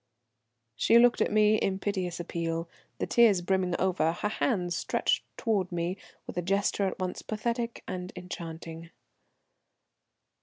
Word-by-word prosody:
She 230 - +5
looked 240 0 +5
at - - +2
me 215 0 +5
in 190 -2 0
piteous 190 -3 -2
appeal, 165 -1 -3 0.3
the - - -1
tears 220 -6 +5
brimming 185 -1 +1
over, 180 -3 +1
her 205 +4 -2
hands 180 -7 0
stretched - - 0
towards 200 -6 0
me 175 +1 -1 0.3
with - - -8
a - - 0
gesture 195 +2 +1
at 190 - -4
once 185 -1 -3
pathetic 235 +2 -3
and 180 0 -5
enchanting. 165 -2 -7
185 Hz, 140 wpm, -29 LUFS, 175-210 Hz, 0.3 s, She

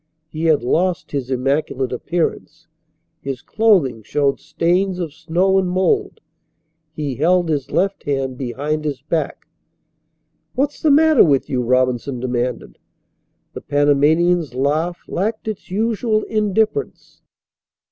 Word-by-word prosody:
He 160 +1 -3
had 155 -6 +3
lost 175 +7 0
his 135 -3 -3
immaculate 135 0 -1
appearance. 170 +7 -3 0.5
His 135 -2 -5
clothing 185 - +2
showed 140 +5 0
stains 180 +2 0
of 170 -5 -4
snow 180 +5 +1
and 185 -1 -1
mould. 190 - 0 0.7
He 150 -3 -4
held 170 +6 +2
his 145 -4 -1
left 195 +1 0
hand 135 -2 -1
behind 140 +5 -3
his 140 -3 -4
back. 160 +2 -2 1.1
"What's 285 +2 -1
the 310 - +3
matter 310 -1 +6
with 140 -4 +1
you?" 125 -2 +1
Robinson 125 +1 0
demanded. 125 - -3 0.7
The - - -7
Panamanian's 145 +2 +2
laugh 155 +6 0
lacked 220 +4 -2
its 215 -3 -5
usual 215 +2 0
indifference. 215 - -1
155 Hz, 120 wpm, -19 LUFS, 135-190 Hz, 1.1 s, matter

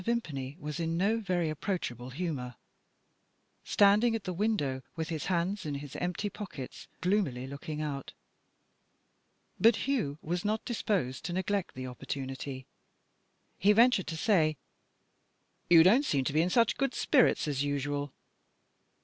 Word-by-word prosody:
Vimpany 155 - -2
was 150 +1 -5
in 165 0 -1
no 210 +5 +2
very 180 -5 0
approachable 150 - -3
humour 130 -5 -4 1.1
standing 210 +3 +4
at 220 - -4
the 185 - -3
window, 170 -10 0
with 160 0 -3
his 160 -3 -3
hands 185 +2 0
in 150 -2 -3
his 140 -1 -7
empty 180 +3 -2
pockets, 195 - -8
gloomily 180 -10 0
looking 150 +3 -5
out. 140 -3 -4 1.5
But 230 0 +6
Hugh 215 - 0
was 175 +2 -2
not 215 +1 -1
disposed 195 - -1
to 175 - -3
neglect 190 +1 -1
the 130 0 -5
opportunity; 130 +1 -5 0.9
he 205 +3 +5
ventured 230 -3 +4
to 160 - -4
say: 160 -6 +2 1.1
"You 165 -2 +9
don't 225 - +5
seem 140 - +1
to 140 - -1
be 155 - +4
in 175 - +1
such 230 +4 +3
good 275 -2 0
spirits 255 - +3
as 140 -2 0
usual." 145 0 -2
170 Hz, 140 wpm, -30 LUFS, 140-205 Hz, 1.5 s, You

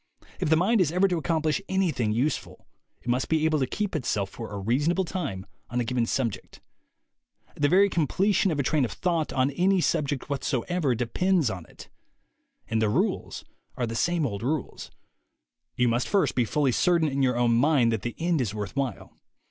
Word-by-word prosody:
If - - 0
the 160 - +5
mind 200 +5 +3
is 160 -4 +2
ever 185 +3 +3
to 175 -3 -1
accomplish 160 +2 0
anything 165 - 0
useful, 125 +8 -2 0.4
it - - -15
must 125 +2 0
be 160 -1 +2
able 155 -1 +2
to 130 - 0
keep 205 +5 -3
itself 100 -9 -1
for 115 - -8
a 100 - -5
reasonable 145 - +1
time 140 - -4 0.2
on 120 - -2
a - - +1
given 120 0 -1
subject. 115 -6 -3 1.0
The 145 0 +1
very 195 +3 +5
completion 195 +4 +1
of 155 -4 -1
a - - +2
train 150 +1 +1
of 120 - -1
thought 170 -4 -1
on 130 +1 +1
any 185 +6 +2
subject 145 -5 -1
whatsoever 140 +1 -1
depends 155 - +1
upon 90 -3 -7
it. - - -13 0.8
And 110 0 0
the 110 - +2
rules - - -1 0.3
are 125 - 0
the 115 - -5
same 170 +6 +1
old 100 -6 -3
rules. 140 +3 -3 0.9
You 125 - +2
must 120 +2 0
first 200 -2 +2
be 125 - +1
fully 140 +4 +1
certain 170 +4 +2
in 140 -1 -1
your 125 -2 +2
own 120 -1 +3
mind 125 -1 +3
that 110 -3 -1
the 120 +2 -4
end 165 -3 0
is 110 -4 -2
worth 105 0 -5
while. 135 -7 -3
140 Hz, 195 wpm, -26 LUFS, 120-170 Hz, 1.0 s, the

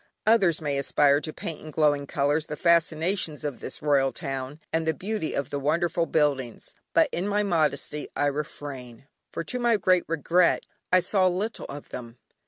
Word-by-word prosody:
Others 195 -8 +4
may 145 -2 -1
aspire 140 +1 +3
to 155 - -5
paint 160 0 -7
in 155 - -9
glowing 145 -2 +1
colours 145 +3 0
the 150 - -4
fascinations 165 0 +1
of 145 -4 -4
this 130 - -8
royal 140 -3 +3
town, 135 -1 -5
and 160 0 0
the 160 - +1
beauty 195 0 -3
of 140 - -2
the 145 - -2
wonderful 165 +3 +1
buildings; 140 -6 -1 0.2
but - - +6
in 180 +4 -2
my 205 0 +1
modesty 155 -5 0
I - - +1
refrain, 140 -4 -5 0.3
for - - -4
to 250 +9 -2
my 240 -2 +3
great 185 -2 +3
regret 170 +3 +2 0.3
I 185 0 +6
saw 190 0 +3
little 195 +5 -2
of 145 +1 -9
them. 120 -1 -8
155 Hz, 180 wpm, -26 LUFS, 140-175 Hz, 0.3 s, but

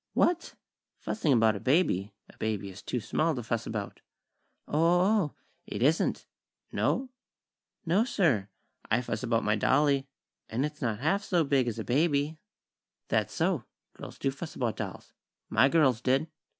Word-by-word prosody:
"What? 350 -1 +1 0.4
Fussing 165 -9 -1
about 115 -4 +4
a - - -4
baby? 125 - +2 0.2
A - - -18
baby 105 -3 -2
is 95 - -11
too 125 - -2
small 155 +8 0
to 120 - -4
fuss 115 +1 -2
about." 105 -3 -5 0.7
"O - - -12
o 170 +2 +4
o 210 +3 +4
o! 150 - -9 0.3
It - - -3
isn't!!" 155 +5 +2 0.5
"No?" 260 -1 0 0.7
"No, 180 +6 +3
sir. 155 - +1 0.4
I 115 +3 +3
fuss 110 -3 -3
about 115 -2 +1
my 105 0 +2
dolly, 140 +4 +2 0.4
an' 125 +6 0
it's 150 0 -7
not 115 -3 -1
half 195 +7 +2
so 175 -5 +2
big 140 -3 +2
as 115 - -2
a - - -3
baby." 150 +2 +1 0.7
"That's - - +1
so. - - 0 0.3
Girls - - -10
do 135 - 0
fuss 155 +4 -8
about 120 -4 -1
dolls. - - -6 0.4
My 135 - +5
girls 135 -7 +3
did." 135 +5 +2
135 Hz, 165 wpm, -29 LUFS, 115-160 Hz, 0.7 s, My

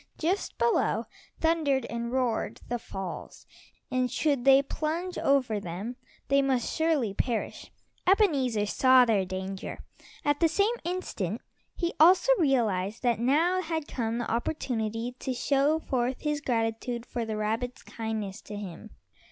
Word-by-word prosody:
Just 360 +5 -1
below 470 - +2 0.3
thundered 310 -6 +2
and 235 0 -4
roared 250 -3 -1
the 240 0 -1
falls, 190 -5 -7 0.5
and 255 -1 +1
should 280 -4 0
they 270 0 +7
plunge 330 +6 -3
over 255 -6 +2
them 195 +6 -5 0.3
they 275 0 +4
must 265 -3 0
surely 315 -10 +1
perish. 235 +2 -3 0.4
Ebenezer 280 - +3
saw 255 +4 +5
their 210 -5 +2
danger. 190 +1 -5 0.5
At 290 0 +2
the 335 - +5
same 400 +8 +2
instant 245 - -3 0.4
he 345 -1 -1
also 360 +9 +6
realized 225 - +1
that 240 -3 +2
now 320 +9 +3
had 320 -3 -3
come 230 -2 -2
the 240 - -3
opportunity 230 -2 -2
to 260 - -3
show 280 +4 +2
forth 255 -4 -1
his 300 -1 -1
gratitude 230 -1 -1
for 240 -1 -3
the 220 -1 -3
rabbit's 225 +4 -2
kindness 220 -3 -4
to 210 - -8
him. 205 +1 -8
250 Hz, 140 wpm, -28 LUFS, 225-300 Hz, 0.5 s, they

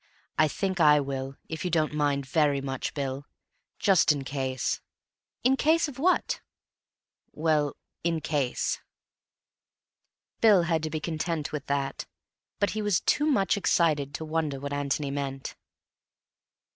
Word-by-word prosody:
"I 155 - +4
think 190 +4 -2
I 150 -2 +7
will, 135 -1 -4
if 160 - -5
you 180 - -1
don't 155 -3 +1
mind 145 -2 +1
very 145 +1 +2
much, 135 -1 -4
Bill. 140 0 -3 0.5
Just 190 -5 +4
in 145 -2 -1
case." 130 -2 -2 0.6
"In 260 +2 +4
case 320 +4 +3
of 270 -3 -9
what?" 360 +5 +2 0.9
"Well, 150 -2 +1 0.3
in 165 -1 +1
case." 140 -5 -1 1.6
Bill, 210 -6 +6
had 165 -1 +1
to 155 - -2
be 155 0 -3
content 160 0 -2
with 150 -3 -5
that, 140 -1 -2 0.5
but 205 - +2
he 215 - -2
was 205 -4 +2
too 295 +1 +2
much 200 -10 +3
excited 150 -7 +1
to 160 - -5
wonder 155 -3 -1
what 140 +1 -4
Antony 145 0 -1
meant. 135 -1 -4
150 Hz, 140 wpm, -28 LUFS, 140-170 Hz, 1.6 s, I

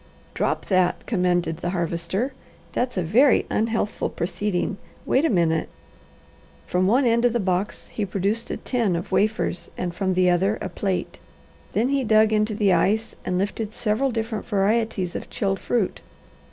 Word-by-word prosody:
"Drop - - -1
that!" 185 -2 +1
commanded 180 -5 +1
the 175 - -3
Harvester. 175 - -2 0.4
"That's 245 -3 -1
a 185 - +1
very 245 - +4
unhealthful 225 -1 0
proceeding. 195 +2 -2 0.3
Wait 275 +5 +2
a - - +3
minute." 165 -5 +1 1.0
From 180 +1 +1
one 250 +6 +4
end 235 0 +3
of 245 -2 +3
the 240 - +1
box 190 0 -2
he 215 - -3
produced 200 +4 -1
a - - -3
tin 230 -8 0
of 170 - -4
wafers 210 -3 0
and 175 -1 -3
from 190 0 -1
the 185 0 +3
other 190 +4 +2
a 190 - -4
plate. 190 +1 -3 0.5
Then 235 +4 +2
he 275 -1 +1
dug 220 -1 +4
into 215 0 +1
the 205 -3 +3
ice 210 +6 +1
and 180 - -1
lifted 210 +3 -2
several 230 +5 +1
different 225 -2 -3
varieties 205 -3 +1
of - - -5
chilled 195 -1 -1
fruit. 230 -6 -1
205 Hz, 165 wpm, -24 LUFS, 180-225 Hz, 1.0 s, very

